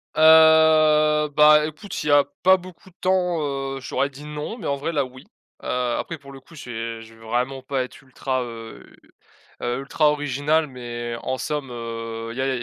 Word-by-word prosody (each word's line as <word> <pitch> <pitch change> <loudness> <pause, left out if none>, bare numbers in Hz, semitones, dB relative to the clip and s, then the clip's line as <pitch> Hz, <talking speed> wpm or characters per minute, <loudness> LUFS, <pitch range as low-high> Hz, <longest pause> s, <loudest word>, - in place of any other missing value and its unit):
Heu, 155 -1 +6
bah, 150 0 +7
écoute 155 +6 -8
s'il 150 - -2
y - - +4
a 145 0 +6 0.2
pas 190 +1 +6
beaucoup 185 0 -14
de 180 - -27
temps, 180 -2 +1 0.4
heu, - - -6
j'aurais 140 +1 -1
dit: 145 +2 -12
«Non», 150 +9 -6
mais 220 - -6
en 140 - 0
vrai 145 +4 -3
là, 145 -4 0
oui. 130 +1 -13 0.4
Heu, - - -6
après 125 +6 -2
pour 140 -1 -14
le 135 - -11
coup 155 +6 -20
j'ai 115 -4 -6
je 115 - -15
veux 115 - -19
vraiment 125 +4 -2
pas 130 0 -2
être 125 - -11
ultra, 130 0 -3
heu 115 -1 -9 0.8
heu, 120 +1 -2
ultra 150 +2 +2
original 145 +2 0
mais 120 -2 -6
en 130 0 -3
somme, 150 -2 -3
heu, 115 -1 -6
il 120 - -11
y - - -1
a 135 0 0
il 125 - -3
y - - -7
140 Hz, 210 wpm, -23 LUFS, 125-155 Hz, 0.8 s, bah